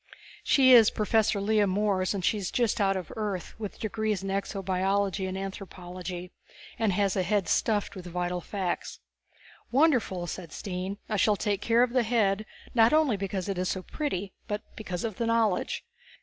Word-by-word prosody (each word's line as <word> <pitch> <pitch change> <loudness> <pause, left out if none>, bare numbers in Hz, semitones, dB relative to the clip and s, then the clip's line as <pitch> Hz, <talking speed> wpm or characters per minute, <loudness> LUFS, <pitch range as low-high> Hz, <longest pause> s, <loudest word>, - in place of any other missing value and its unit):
She 260 -2 +6
is 230 -3 +8
Professor 215 -1 +1
Lea 205 0 +2
Morees, 195 0 +1
and 185 -3 -2
she 215 - +2
is 190 - -3
just 235 -4 +1
out 195 -1 +3
from 185 -4 -5
Earth 205 -5 -3
with 210 -3 -6
degrees 215 -2 -1
in 195 - -3
exobiology 195 0 0
and 185 - -4
anthropology, 180 -2 -6 0.5
and 220 -3 +2
has 200 0 +1
a 190 - +2
head 195 0 +1
stuffed 210 +2 +1
with 180 -2 -8
vital 180 0 -2
facts." 185 -1 -3 0.7
"Wonderful!" 245 - +2
Stine 180 +2 -5
said. - - -5
"I - - +1
shall 210 +1 +4
take 205 0 -1
care 230 +1 +4
of 245 -1 -1
the 255 - +4
head, 215 -3 +1 0.3
not 230 +1 +5
only 305 -7 +4
because 195 -1 -3
it 195 -2 -2
is 185 - 0
so 185 - -2
pretty 200 - -3
but 210 +1 -3
because 185 -5 -5
of 225 -2 -4
its 230 - +1
knowledge. 230 - +1
200 Hz, 175 wpm, -28 LUFS, 185-220 Hz, 0.7 s, is